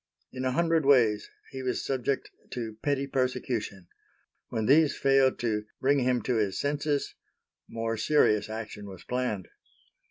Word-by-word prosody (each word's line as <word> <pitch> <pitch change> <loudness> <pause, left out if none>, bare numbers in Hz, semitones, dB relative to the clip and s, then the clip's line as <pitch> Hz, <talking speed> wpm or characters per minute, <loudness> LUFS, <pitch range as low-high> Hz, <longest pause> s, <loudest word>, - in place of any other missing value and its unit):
In 130 0 -4
a 130 - +1
hundred 165 +1 +2
ways 120 -7 +4 0.2
he 130 - -6
was 130 -1 -2
subject 135 0 -1 0.2
to 110 -3 -5
petty 140 -1 0
persecution. 125 -8 -2 0.6
When 110 -1 -2
these 150 +4 +4
failed 135 -1 +3
to 105 -3 -1
"bring 140 +2 +3
him 125 -1 +1
to 125 -3 0
his 100 -3 0
senses," 145 0 -1 0.6
more 115 0 -2
serious 110 -4 +3
action 110 -2 -6
was 95 -2 -10
planned. 125 -7 -2
125 Hz, 140 wpm, -28 LUFS, 110-135 Hz, 0.6 s, ways